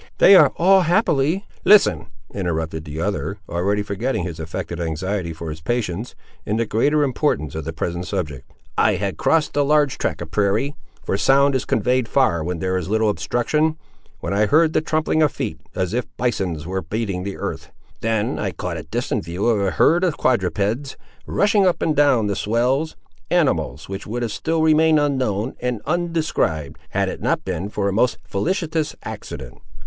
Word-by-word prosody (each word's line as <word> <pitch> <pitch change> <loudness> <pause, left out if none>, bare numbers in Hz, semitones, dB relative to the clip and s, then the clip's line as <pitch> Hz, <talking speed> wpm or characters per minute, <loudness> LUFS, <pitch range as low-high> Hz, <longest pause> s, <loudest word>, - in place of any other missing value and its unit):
"They 195 - +8
are 155 -7 +7
all 190 +3 +5
happily—" 175 -1 +2 0.2
"Listen," 210 - +5 0.3
interrupted 80 -4 -3
the 75 +1 -6
other, 100 +2 -2
already 100 +4 0
forgetting 105 +1 -2
his 85 -2 -5
affected 80 +2 -5
anxiety 85 +2 -2
for 80 0 -6
his 80 +1 -8
patients, 110 +2 -2 0.3
in 105 - -1
the 115 - +1
greater 145 +8 +2
importance 130 - 0
of 80 -2 -5
the 80 - -3
present 85 +2 -3
subject. 75 -7 -4 0.3
"I - - +4
had 100 -2 -3
crossed 160 -2 +1
a 145 - +3
large 145 -2 +2
tract - - -1
of 80 - -11
prairie—for 105 +2 -1
sound 140 +5 +4
is 130 - 0
conveyed 125 -1 +1
far 85 - +2
where 90 +2 -2
there 95 +2 -1
is 90 0 -4
little 110 0 +2
obstruction—when 120 - -2
I 105 +1 +3
heard 160 +5 +4
the - - +2
trampling 155 0 0
of 150 - +4
feet, - - -4 0.2
as 95 +1 -1
if 125 0 -1
bisons 95 -10 -1
were 95 +2 -2
beating 100 +1 -3
the 100 +1 -5
earth. - - -5 0.3
Then 110 -2 -1
I - - -2
caught - - -4
a - - -4
distant - - -2
view 85 +4 -3
of 115 -4 +3
a 100 - +1
herd 165 - +3
of 175 -5 +1
quadrupeds, 115 +3 0 0.3
rushing 205 -1 +3
up 180 - +1
and 155 - 0
down 140 -6 +4
the 100 -1 -1
swells—animals, 125 - -1
which 95 0 -6
would 120 +3 -3
have 115 - -2
still 160 +8 -1
remained 160 0 +5
unknown 130 -6 0
and 125 -2 -2
undescribed, 155 - -1
had - - 0
it - - -5
not - - 0
been 95 +1 -3
for 100 -1 -1
a 100 - 0
most 120 +4 +2
felicitous 160 - -1
accident! - - -8
110 Hz, 175 wpm, -21 LUFS, 90-150 Hz, 0.3 s, They